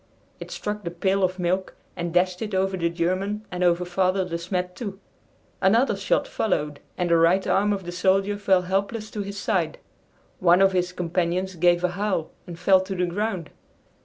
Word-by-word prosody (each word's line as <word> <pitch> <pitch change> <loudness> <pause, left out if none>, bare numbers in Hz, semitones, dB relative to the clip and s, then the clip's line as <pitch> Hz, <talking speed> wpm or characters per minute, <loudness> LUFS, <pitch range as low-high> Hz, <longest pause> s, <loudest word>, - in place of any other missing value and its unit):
It - - -8
struck 210 0 -4
the 170 - -3
pail 190 +3 0
of 185 0 +1
milk 185 +1 -1 0.2
and 170 0 -3
dashed 180 +1 +1
it 210 -3 -3
over 190 0 +1
the 170 -2 0
German 185 +5 -1
and 180 0 -2
over 175 0 +3
Father 185 +1 +1
De 170 - -4
Smet 180 +1 -3
too. 195 -2 -6 0.6
Another 225 +8 +3
shot - - 0
followed, 150 - -1 0.2
and 175 -1 0
the 170 - +6
right 170 +4 +4
arm 205 +2 +2
of 200 -2 -2
the 175 - -6
soldier 195 +3 +1
fell 190 -2 +3
helpless 200 +4 -2
to 210 - -4
his 200 0 -6
side. 200 - 0 0.6
One 175 0 +5
of 195 0 +5
his 180 -1 0
companions 180 +1 -1
gave 175 0 +3
a 180 - +3
howl 190 -3 -2 0.2
and 170 -2 -7
fell 185 +2 +4
to 190 +1 -5
the 180 0 +1
ground. 185 -2 -3
185 Hz, 190 wpm, -24 LUFS, 175-195 Hz, 0.6 s, the